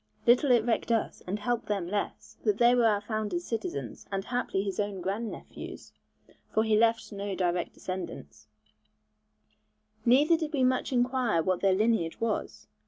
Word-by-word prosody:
Little 250 Hz, +4 st, +5 dB
it 240 Hz, -3 st, +4 dB
recked 235 Hz, 0 st, 0 dB
us 225 Hz, -2 st, 0 dB
and 195 Hz, +3 st, -1 dB
helped 235 Hz, +2 st, -2 dB
them 200 Hz, -4 st, -1 dB
less, 205 Hz, +2 st, -4 dB
that 420 Hz, -, +2 dB
they 240 Hz, 0 st, +5 dB
were 240 Hz, -2 st, +4 dB
our 205 Hz, -2 st, +2 dB
founder's 215 Hz, +11 st, -2 dB
citizens, 140 Hz, -, -4 dB
and 195 Hz, 0 st, -2 dB
haply 245 Hz, -5 st, -1 dB
his 200 Hz, 0 st, -4 dB
own 205 Hz, -2 st, -1 dB
grand 205 Hz, +5 st, -2 dB
nephews -, -, -9 dB, 0.6 s
(for 220 Hz, -, +2 dB
he 220 Hz, -1 st, +2 dB
left 225 Hz, +1 st, +2 dB
no 200 Hz, -1 st, -4 dB
direct 175 Hz, -1 st, -1 dB
descendants), 185 Hz, 0 st, -7 dB, 1.6 s
neither 290 Hz, +7 st, +5 dB
did 315 Hz, -1 st, -4 dB
we 270 Hz, -3 st, +2 dB
much 255 Hz, +1 st, +1 dB
inquire 245 Hz, -8 st, +2 dB
what 185 Hz, 0 st, +1 dB
their 195 Hz, -1 st, +4 dB
lineage 210 Hz, -5 st, +1 dB
was. 210 Hz, -, -2 dB
220 Hz, 165 wpm, -29 LUFS, 195-245 Hz, 1.6 s, Little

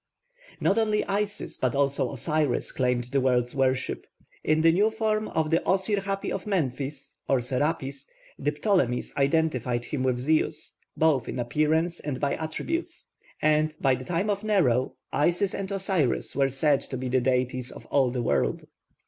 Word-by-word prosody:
Not 200 Hz, -, +2 dB
only 215 Hz, -1 st, +1 dB
Isis 205 Hz, +1 st, -2 dB
but 130 Hz, -1 st, 0 dB
also 140 Hz, 0 st, +1 dB
Osiris 150 Hz, +1 st, 0 dB
claimed 125 Hz, -1 st, 0 dB
the 135 Hz, -1 st, +2 dB
world's 125 Hz, -2 st, +1 dB
worship. 130 Hz, -1 st, 0 dB, 0.4 s
In 155 Hz, +1 st, +2 dB
the 165 Hz, 0 st, +6 dB
new 205 Hz, +6 st, +3 dB
form 220 Hz, -1 st, -1 dB
of 160 Hz, -1 st, -1 dB
the 165 Hz, -, +4 dB
Osir 195 Hz, +2 st, +1 dB
hapi 195 Hz, 0 st, -3 dB
of 195 Hz, -, -4 dB
Memphis, 140 Hz, -6 st, -2 dB
or 135 Hz, -, +3 dB
Serapis, 135 Hz, +2 st, -2 dB, 0.3 s
the 145 Hz, -, 0 dB
Ptolemies 150 Hz, -, 0 dB
identified 135 Hz, -5 st, +1 dB
him 145 Hz, -, -3 dB
with 130 Hz, -1 st, +1 dB
Zeus, 155 Hz, +3 st, 0 dB, 0.2 s
both 155 Hz, -6 st, +2 dB
in -, -, -4 dB
appearance 155 Hz, +7 st, +1 dB
and 140 Hz, -3 st, -4 dB
by 140 Hz, -1 st, 0 dB
attributes. 330 Hz, -, -4 dB, 0.3 s
And, 155 Hz, 0 st, +3 dB
by 135 Hz, -2 st, +3 dB
the 130 Hz, 0 st, -3 dB
time 180 Hz, +7 st, 0 dB
of 200 Hz, +1 st, -3 dB
Nero, 145 Hz, -, +2 dB, 0.2 s
Isis 175 Hz, +5 st, +2 dB
and 195 Hz, 0 st, -4 dB
Osiris 190 Hz, -, 0 dB
were 135 Hz, 0 st, +3 dB
said 135 Hz, +1 st, +2 dB
to 130 Hz, -, -5 dB
be 130 Hz, +1 st, -4 dB
the 130 Hz, 0 st, +2 dB
deities 125 Hz, 0 st, 0 dB
of -, -, -11 dB
all 135 Hz, -3 st, +3 dB
the 125 Hz, 0 st, -2 dB
world. 70 Hz, -, 0 dB
150 Hz, 165 wpm, -26 LUFS, 130-185 Hz, 0.4 s, the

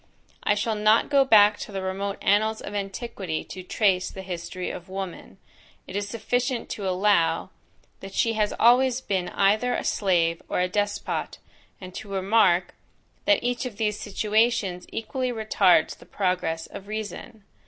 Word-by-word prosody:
I 205 Hz, -, +2 dB
shall 215 Hz, +2 st, -1 dB
not 215 Hz, +5 st, +3 dB
go 280 Hz, -1 st, +6 dB
back 210 Hz, -4 st, +6 dB
to -, -, -7 dB
the 195 Hz, -1 st, -4 dB
remote 195 Hz, +1 st, -3 dB
annals 215 Hz, +2 st, +2 dB
of 205 Hz, -, -7 dB
antiquity 195 Hz, -4 st, -4 dB
to 185 Hz, -, -9 dB
trace 185 Hz, 0 st, +1 dB
the 190 Hz, -, -9 dB
history 180 Hz, 0 st, -5 dB
of 180 Hz, -, -9 dB
woman; 190 Hz, -2 st, -7 dB, 0.5 s
it -, -, -9 dB
is 205 Hz, 0 st, -2 dB
sufficient 245 Hz, +3 st, -2 dB
to 200 Hz, -2 st, -4 dB
allow, 185 Hz, -2 st, +2 dB, 0.5 s
that 195 Hz, 0 st, -10 dB
she 230 Hz, -, +2 dB
has 210 Hz, -1 st, +1 dB
always 250 Hz, +2 st, +5 dB
been 190 Hz, -7 st, -2 dB
either 215 Hz, +5 st, +2 dB
a -, -, -2 dB
slave 170 Hz, -4 st, +1 dB
or -, -, 0 dB
a 180 Hz, -, +2 dB
despot, 205 Hz, +2 st, -2 dB, 0.4 s
and 185 Hz, -1 st, -10 dB
to 205 Hz, -, -8 dB
remark, 190 Hz, -2 st, +2 dB, 0.5 s
that 305 Hz, 0 st, +3 dB
each 245 Hz, +1 st, -1 dB
of 215 Hz, -5 st, -10 dB
these 210 Hz, -1 st, -1 dB
situations 210 Hz, -3 st, 0 dB
equally 255 Hz, +3 st, -3 dB
retards 205 Hz, -7 st, +3 dB
the -, -, -18 dB
progress 180 Hz, -4 st, -1 dB
of 200 Hz, -, -10 dB
reason. 215 Hz, +1 st, -6 dB
205 Hz, 160 wpm, -25 LUFS, 190-220 Hz, 0.5 s, go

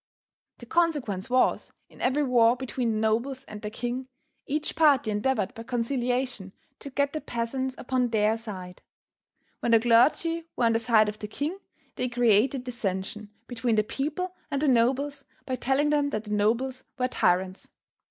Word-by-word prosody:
The 240 Hz, -, -11 dB
consequence 275 Hz, -, 0 dB
was, 255 Hz, +1 st, +2 dB, 0.2 s
in -, -, -16 dB
every 275 Hz, +4 st, +2 dB
war 240 Hz, -2 st, +4 dB
between 245 Hz, -2 st, -2 dB
the -, -, -1 dB
nobles 235 Hz, +5 st, 0 dB
and 210 Hz, -1 st, -9 dB
the 210 Hz, -, -4 dB
king, 245 Hz, +3 st, -4 dB, 0.4 s
each 300 Hz, +2 st, -2 dB
party 285 Hz, -8 st, +4 dB
endeavored 210 Hz, -1 st, 0 dB
by 225 Hz, -, -8 dB
conciliation 245 Hz, -3 st, -2 dB, 0.3 s
to 280 Hz, -, -7 dB
get 280 Hz, +1 st, 0 dB
the 310 Hz, -, -3 dB
peasants 255 Hz, +3 st, -3 dB
upon 255 Hz, -1 st, 0 dB
their 220 Hz, -1 st, +2 dB
side. 190 Hz, -6 st, -8 dB, 0.8 s
When 235 Hz, -, +1 dB
the 230 Hz, -, +7 dB
clergy 290 Hz, +8 st, +3 dB
were 240 Hz, -, +1 dB
on 230 Hz, -, +4 dB
the 225 Hz, -, +2 dB
side 225 Hz, -2 st, +4 dB
of 210 Hz, 0 st, -5 dB
the 210 Hz, -, -5 dB
king 300 Hz, -, -4 dB, 0.4 s
they 250 Hz, -, -1 dB
created 245 Hz, +2 st, +3 dB
dissension 215 Hz, -3 st, -4 dB, 0.2 s
between 235 Hz, -1 st, -1 dB
the 215 Hz, -, +3 dB
people 300 Hz, -, -3 dB, 0.2 s
and 280 Hz, -2 st, -1 dB
the 300 Hz, -, +1 dB
nobles 270 Hz, +3 st, +2 dB, 0.2 s
by 260 Hz, -, -3 dB
telling 270 Hz, +4 st, +1 dB
them 290 Hz, -1 st, +2 dB
that 215 Hz, -5 st, -3 dB
the 210 Hz, -, -8 dB
nobles 235 Hz, +5 st, 0 dB
were 250 Hz, -1 st, +1 dB
tyrants. 185 Hz, -4 st, 0 dB
245 Hz, 170 wpm, -27 LUFS, 220-270 Hz, 0.8 s, the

